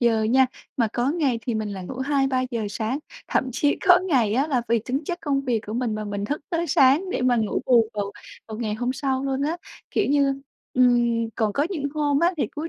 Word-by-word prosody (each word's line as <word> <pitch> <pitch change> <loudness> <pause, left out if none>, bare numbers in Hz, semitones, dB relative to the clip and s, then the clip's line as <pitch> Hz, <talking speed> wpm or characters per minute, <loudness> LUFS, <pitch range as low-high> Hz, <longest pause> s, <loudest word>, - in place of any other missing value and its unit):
giờ 230 -2 +3
nha, 255 +4 +4 0.3
mà 230 -4 +2
có 250 +3 +1
ngày 285 -8 0
thì 235 0 -2
mình 215 -1 -2
lại 195 -2 -6
ngủ 255 - -7
2-3 270 -1 +1
giờ 230 -4 -2
sáng, 225 +6 -2 0.3
thậm - - +1
chí 290 +3 +1
có 360 0 +9
ngày 235 - +2
á 270 +5 +2
là 255 -6 0
vì 235 0 +3
tính 270 +5 -2
chất 350 +2 -3
công 285 -3 0
việc 245 -5 0
của 210 - -5
mình 240 -3 -1
mà 215 0 -4
mình 205 -1 -4
thức 295 +8 -2
tới 340 0 0
sáng 285 +6 +4
để 255 - -1
mà 250 -1 +3
ngủ 220 -2 0
bù 230 -3 +4
vào 200 -1 -3 0.4
vào 220 0 -6
ngày 215 -3 -2
hôm 245 +3 -1
sau 270 -1 -1
luôn 270 0 -1
á. 320 +4 0 0.3
Kiểu 415 - +1
như, 275 -1 +2 0.3
ừm, 240 -2 +3
còn 215 -2 0
có 285 +8 +1
những 315 -7 -3
hôm 290 -2 +1
á 345 +2 +3
thì 295 - 0
cuối 310 +2 -6
255 Hz, 240 wpm, -24 LUFS, 225-285 Hz, 0.4 s, có